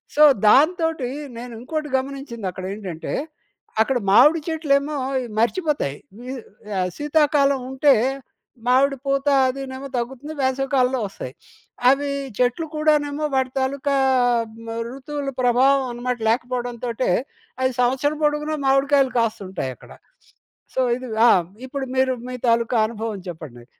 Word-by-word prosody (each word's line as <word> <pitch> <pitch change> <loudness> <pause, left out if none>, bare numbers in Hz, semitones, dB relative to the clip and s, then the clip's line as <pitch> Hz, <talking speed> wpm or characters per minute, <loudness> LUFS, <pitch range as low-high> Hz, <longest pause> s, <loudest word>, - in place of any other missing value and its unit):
So, 300 - +3 0.2
దాంతోటీ 315 - +3 0.3
నేను 245 0 -7
ఇంకోటి 305 +4 -4
గమనించిందక్కడేంటంటే, 205 - -5 0.7
అక్కడ 260 +3 +2
మావిడి 285 +11 +6
చెట్లేమో 300 -2 +1 0.3
ఇ - - -5
మర్చిపోతాయి. 260 - 0 0.2
వి 250 +2 -6 0.4
ఆహ్, 185 -1 0
శీతాకాలం 290 -2 +2
ఉంటే, 275 +1 +4 0.7
మామిడి 275 +2 +3
పూత 275 0 0 0.2
అదీనేమో 265 +1 -5
తగ్గుతుంది, 265 +5 -4
వేసవి 265 +1 0
కాలంలో 255 0 +2
వస్తాయి. 130 -9 -8 0.6
అవీ 280 +1 +2 0.3
చెట్లు 250 +6 +1
కూడానేమో 300 -1 +1
వాటి 260 -1 +1
తాలూకా 275 +1 0 0.7
మ్ - - -7 0.2
ఋతువుల 275 +1 -5
ప్రభావం 260 +3 +4
అనమాట, 245 +1 -3
లేకపోవడంతోటే 245 0 -1 0.5
అది 260 0 +2
సంవత్సరం 265 +5 +1
పొడుగున 300 +1 +1
మావిడికాయలు 270 0 +3
కాస్తుంటాయక్కడ. 195 - -3 0.8
సో, - - 0 0.2
ఇది 255 -1 -8 0.2
ఆ! - - +8 0.4
ఇప్పుడు 275 0 -4
మీరు, 260 0 +3 0.2
మీ 255 - -4
తాలూకా 230 +1 +2
అనుభవం 220 -2 -5
చెప్పండి. 150 -8 -9
265 Hz, 115 wpm, -22 LUFS, 240-285 Hz, 0.8 s, ఆ